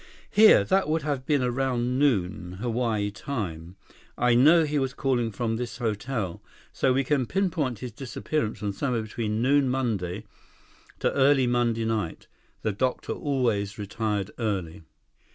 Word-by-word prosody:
Here, 215 +1 +7
that 190 -4 +1
would 160 -1 0
have 140 -3 -3
been 145 -4 +2
around 125 0 0
noon, 95 -9 0
Hawaii 110 -1 -1
time. 95 - -5 0.4
I 120 0 +3
know 155 +8 +6
he 150 -1 0
was 135 -1 -2
calling 125 -5 0
from 115 0 -2
this 120 0 -5
hotel. 110 -4 -3 0.3
So, 130 - +2
we 135 +2 +2
can 135 -2 0
pinpoint 165 - 0
his 125 +1 -6
disappearance 130 -2 -3
from 100 -1 -3
sometime 120 0 -1
between 110 0 -2
noon 140 0 +3
Monday, 110 -7 -2 0.8
to - - +1
early 135 -1 +4
Monday 120 -2 +1
night. 110 -7 -2 0.4
The 110 - +1
doctor 125 +6 -1
always 115 -8 -1
retired 105 -1 -2
early." 95 -9 -2
120 Hz, 145 wpm, -26 LUFS, 105-135 Hz, 0.8 s, Here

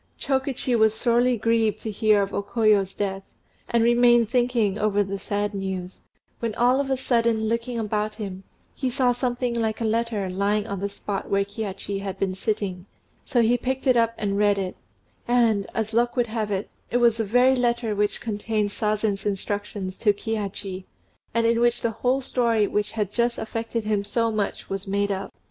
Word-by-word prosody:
Chokichi 265 -2 0
was 220 -1 +4
sorely 240 +2 +2
grieved 225 -1 +1
to 220 - -4
hear 210 -1 +3
of 195 - -5
O - - 0
Koyo's 205 -2 +2
death, 195 -1 -2 0.5
and 235 -1 +3
remained 240 -1 +5
thinking 240 -5 +1
over 205 -1 +2
the 195 0 -4
sad 205 +1 -2
news; 190 -2 -5 0.4
when 230 -2 -2
all 250 +2 +3
of 275 - -4
a 265 - +1
sudden 235 -3 +1
looking 230 +2 -1
about 215 -1 -1
him, 195 -3 -6 0.3
he 260 - -2
saw 250 0 +2
something 245 0 -1
like 225 -2 -1
a 230 - -1
letter 220 -2 0
lying 200 +3 0
on 200 -4 -4
the 200 +1 -2
spot 200 0 -5
where 200 0 +2
Kihachi 200 -1 -4
had 195 -1 -5
been 190 -1 -1
sitting, 190 -2 -3 0.4
so 240 -2 +2
he 240 +2 +3
picked 265 +2 -2
it 255 -2 +5
up 230 -1 +2
and 200 -1 -1
read 205 -1 +3
it; 190 -2 -3 0.5
and, 230 -5 +3
as 220 0 -2
luck 240 +1 +2
would 245 -2 +2
have 220 -2 -3
it, 200 0 -2 0.2
it 245 - +1
was 235 -2 +4
the 225 - 0
very 245 +5 +4
letter 240 -3 0
which 205 0 0
contained 215 -1 -1
Sazen's 210 -1 -1
instructions 205 -1 -3
to 210 -3 +3
Kihachi, 200 -3 -4 0.5
and 230 0 +1
in 230 0 +3
which 240 0 +2
the 230 - 0
whole 250 +4 0
story 235 -4 +2
which 210 +1 -1
had 210 -3 -2
just 235 0 +1
affected 225 +1 -3
him 210 -1 0
so 230 +2 0
much 210 -2 -2
was 195 +1 -4
made 200 +1 0
up. 195 0 -3
220 Hz, 190 wpm, -24 LUFS, 200-235 Hz, 0.5 s, remained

